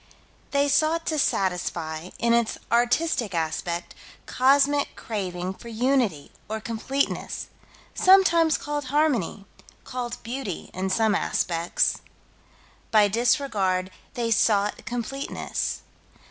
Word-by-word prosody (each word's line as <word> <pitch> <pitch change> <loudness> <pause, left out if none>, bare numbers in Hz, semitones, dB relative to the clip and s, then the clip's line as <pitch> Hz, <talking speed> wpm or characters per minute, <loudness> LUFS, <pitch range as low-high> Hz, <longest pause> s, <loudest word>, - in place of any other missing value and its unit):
They 280 0 +2
sought 320 +3 +2
to 310 -2 0
satisfy, 175 - -1
in 235 0 +2
its 235 -1 +1
artistic 240 - +1
aspect, 170 +1 -2 0.3
cosmic 280 +2 +3
craving 185 -4 -4
for 235 - -13
unity 235 - 0 0.2
or 220 0 -2
completeness, 240 +5 -2 0.4
sometimes 340 -4 +5
called 295 -1 -4
harmony, 255 - 0 0.4
called 245 -1 -5
beauty 230 -5 -5
in 190 +1 -2
some 220 +2 +2
aspects. 170 -3 0 0.9
By 210 -2 +5
disregard 200 -5 +1 0.2
they 235 -1 -1
sought 210 -1 +2
completeness. 245 +3 -3
235 Hz, 100 wpm, -25 LUFS, 190-275 Hz, 0.9 s, sometimes